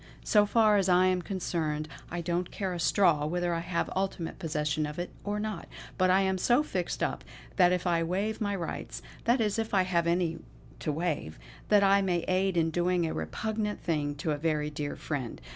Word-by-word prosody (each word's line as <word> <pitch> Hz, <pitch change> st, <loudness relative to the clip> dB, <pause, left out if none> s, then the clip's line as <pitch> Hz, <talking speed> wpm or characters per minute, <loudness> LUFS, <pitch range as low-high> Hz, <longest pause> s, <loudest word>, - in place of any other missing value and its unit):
So 210 Hz, -1 st, +4 dB
far 215 Hz, -1 st, +4 dB
as 195 Hz, -2 st, +2 dB
I 180 Hz, +1 st, +5 dB
am 185 Hz, -1 st, +2 dB
concerned, 160 Hz, -5 st, -2 dB, 0.2 s
I 175 Hz, 0 st, -3 dB
don't 175 Hz, +1 st, -1 dB
care 190 Hz, -3 st, -3 dB
a 175 Hz, -, -4 dB
straw 165 Hz, -4 st, +3 dB
whether 175 Hz, +1 st, 0 dB
I 165 Hz, -, 0 dB
have 170 Hz, 0 st, -1 dB
ultimate 190 Hz, -3 st, -2 dB
possession 150 Hz, -2 st, -1 dB
of 150 Hz, -, -7 dB
it 175 Hz, +1 st, -4 dB
or 205 Hz, +1 st, -2 dB
not; 215 Hz, 0 st, -4 dB, 0.3 s
but 185 Hz, -1 st, +2 dB
I 190 Hz, +1 st, +5 dB
am 190 Hz, -1 st, +1 dB
so 240 Hz, +9 st, +3 dB
fixed 185 Hz, -, -2 dB
up -, -, -2 dB, 0.3 s
that 180 Hz, -2 st, +6 dB
if 180 Hz, 0 st, 0 dB
I 170 Hz, -2 st, +2 dB
waive 195 Hz, +7 st, -1 dB
my 205 Hz, -1 st, 0 dB
rights 165 Hz, -, -5 dB, 0.2 s
that 240 Hz, +2 st, +3 dB
is 215 Hz, -1 st, +1 dB
if 225 Hz, -2 st, -1 dB
I 190 Hz, -, +5 dB
have 170 Hz, -2 st, +1 dB
any 170 Hz, -1 st, +1 dB, 0.4 s
to 155 Hz, -, -1 dB
waive 150 Hz, -, -2 dB, 0.3 s
that 205 Hz, -1 st, +5 dB
I 200 Hz, 0 st, +5 dB
may 180 Hz, -3 st, +1 dB
aid 185 Hz, 0 st, +1 dB
in 165 Hz, -1 st, +2 dB
doing 175 Hz, +1 st, +1 dB
a 160 Hz, -, -2 dB
repugnant 215 Hz, -1 st, -3 dB
thing 150 Hz, -4 st, -1 dB
to 155 Hz, +2 st, -2 dB
a 150 Hz, -, 0 dB
very 150 Hz, -1 st, 0 dB
dear 145 Hz, 0 st, -4 dB
friend. 135 Hz, -6 st, -4 dB
180 Hz, 210 wpm, -29 LUFS, 160-195 Hz, 0.4 s, that